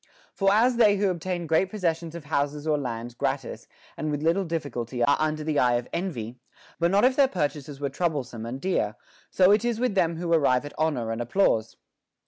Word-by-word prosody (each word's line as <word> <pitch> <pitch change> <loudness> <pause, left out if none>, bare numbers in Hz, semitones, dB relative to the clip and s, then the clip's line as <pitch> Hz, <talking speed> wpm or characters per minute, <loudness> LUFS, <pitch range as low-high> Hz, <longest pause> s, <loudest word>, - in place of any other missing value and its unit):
* - - -31
For 195 -1 +2
as 235 +4 +3
they 210 -4 +5
who 195 -1 +2
obtain 175 0 -3
great 160 +4 +2
possessions 170 -5 -2
of 170 -3 -8
houses 145 0 -1
or 155 -1 +2
lands 120 -4 -4
gratis - - -3 0.3
and 155 - -3
with 145 0 -2
little 170 +5 +2
difficulty 130 -7 -3
are 140 - +4
under 155 0 -1
the 150 -1 0
eye 125 -1 +3
of 120 0 -2
envy, 125 - -4 0.4
but 170 0 +3
not 200 +5 +4
if 255 0 +3
their 275 -1 +5
purchases 145 - -3
were 140 -1 -2
troublesome 140 -7 -3
and 125 +3 -5
dear, 135 - -1 0.3
so 185 +1 +4
it 210 +1 +4
is 240 -2 -1
with 250 -3 0
them 170 -4 +1
who 170 0 -1
arrive 140 -4 +3
at 145 - -8
honor 145 -8 -1
and 115 +1 -3
applause. 120 - +1
155 Hz, 210 wpm, -26 LUFS, 135-185 Hz, 0.4 s, they